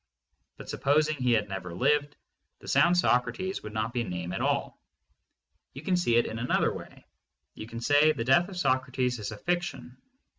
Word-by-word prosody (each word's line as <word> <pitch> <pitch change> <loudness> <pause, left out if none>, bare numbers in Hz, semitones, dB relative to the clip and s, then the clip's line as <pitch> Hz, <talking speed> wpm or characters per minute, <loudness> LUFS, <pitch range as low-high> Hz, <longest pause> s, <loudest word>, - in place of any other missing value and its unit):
But - - -11
supposing 150 +2 +1
he 125 -2 +2
had 110 -2 +1
never 95 -3 -6
lived, 145 +8 +1 0.4
the - - -15
sound 175 +1 +4
"Socrates" 185 +6 +1
would 105 - -8
not 110 +2 -2
be 120 - 0
a - - -1
name 90 -3 -5
at - - -3
all. - - -1 0.9
You 135 - -9
can 185 +2 +1
see 175 -10 +2
it 120 - +4
in 115 - -5
another 125 - +1
way. - - -11 0.5
You 110 - -9
can 115 0 -7
say 145 +4 +4
"The 115 - -3
death 175 +9 +4
of 190 - -8
Socrates 130 -4 0
is 105 0 -5
a 110 - -7
fic 175 +9 0
tion." 125 -6 -8
125 Hz, 195 wpm, -28 LUFS, 115-155 Hz, 0.9 s, sound